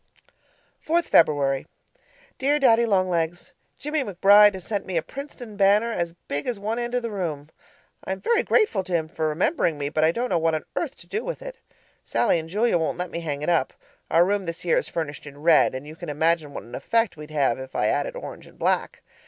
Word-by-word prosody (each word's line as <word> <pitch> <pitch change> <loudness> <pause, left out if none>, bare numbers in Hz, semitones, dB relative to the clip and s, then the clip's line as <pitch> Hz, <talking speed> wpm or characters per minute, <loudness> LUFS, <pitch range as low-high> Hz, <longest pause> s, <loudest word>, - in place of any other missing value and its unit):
4th 340 +2 +2
February 140 - +3 0.7
Dear 285 +2 +2
Daddy 235 -4 +4
Long 190 -3 +2
Legs, 170 -1 -2 0.2
Jimmie 300 0 -2
McBride 205 0 +6
has 185 - -8
sent 205 0 -3
me 185 -2 -2
a 160 - 0
Princeton 260 -5 -9
banner 205 +3 +4
as 170 -6 -2
big 145 +1 -3
as 240 -5 -2
one 220 +4 -2
end 240 +1 -3
of 245 - 0
the 230 - -3
room; 160 -7 -4 0.5
I - - -5
am 190 - -3
very 460 - +2
grateful 420 - +2
to 185 - -5
him 160 -2 +1
for 160 0 -2
remembering 165 - 0
me, 145 0 -2
but 155 +1 0
I 160 - +5
don't 245 +7 -2
know 175 - +2
what 165 0 +1
on 155 - -4
earth - - -2
to - - -17
do 435 - -3
with - - -5
it. - - -9 0.4
Sallie 170 - +1
and 160 0 -8
Julia 210 0 +2
won't 160 - -1
let 180 -1 -4
me 170 - -3
hang 150 -3 -4
it 150 - -1
up; 165 -6 +1 0.4
our 170 +1 +5
room 200 -1 -1
this 165 0 -5
year 485 - +3
is - - -5
furnished 150 -3 -5
in 140 0 -11
red, 160 -5 +5
and 130 +2 -6
you 155 +1 -10
can 175 -2 -8
imagine 160 0 +1
what - - -7
an 120 - -15
effect 230 -2 0
we'd 150 0 -10
have 140 -5 +1
if 130 0 -9
I - - +1
added - - 0
orange - - -8
and - - -18
black. - - -1
175 Hz, 230 wpm, -24 LUFS, 155-230 Hz, 0.7 s, McBride